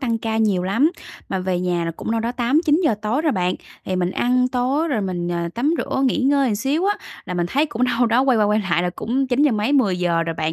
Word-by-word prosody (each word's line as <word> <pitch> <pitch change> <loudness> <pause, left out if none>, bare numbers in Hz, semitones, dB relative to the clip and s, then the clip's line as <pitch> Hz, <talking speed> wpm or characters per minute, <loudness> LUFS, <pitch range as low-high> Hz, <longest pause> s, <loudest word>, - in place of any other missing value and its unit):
tăng 235 -4 -1
ca 220 0 -2
nhiều 210 -5 +1
lắm, 230 - +2 0.4
mà 190 - -2
về 185 -1 -1
nhà 175 -2 -1
là 165 - -2
cũng 165 - -6
đâu 225 0 0
đó 235 +2 -2
8:00-9:00 295 +4 +2
tối 230 +8 0
rồi 310 -3 +2
bạn. 180 -2 0 0.3
Thì 185 - -2
mình 180 -1 0
ăn 250 +4 +1
tối 260 +6 0
rồi 250 -8 0
mình, 180 -3 -3
ờ, 170 -1 -2
tắm 285 +8 +1
rửa 270 - -1
nghỉ 260 - +1
ngơi 270 -4 +2
xíu 275 - -1
á, 410 0 +1 0.3
là 180 - -5
mình 175 -1 0
thấy 280 - +1
cũng 250 -4 -1
đâu 245 -1 +1
đó 235 +3 +3
quay 265 -3 +3
qua 210 - +4
quay 210 +1 +2
lại 175 - +2
là 180 - -1
cũng 255 +8 -2
chín 255 +3 +1
giờ 295 - +4
mấy, 215 +5 0
10:00 180 -10 +2
rồi 165 0 -3
bạn. 155 0 -2
230 Hz, 260 wpm, -21 LUFS, 185-270 Hz, 0.4 s, qua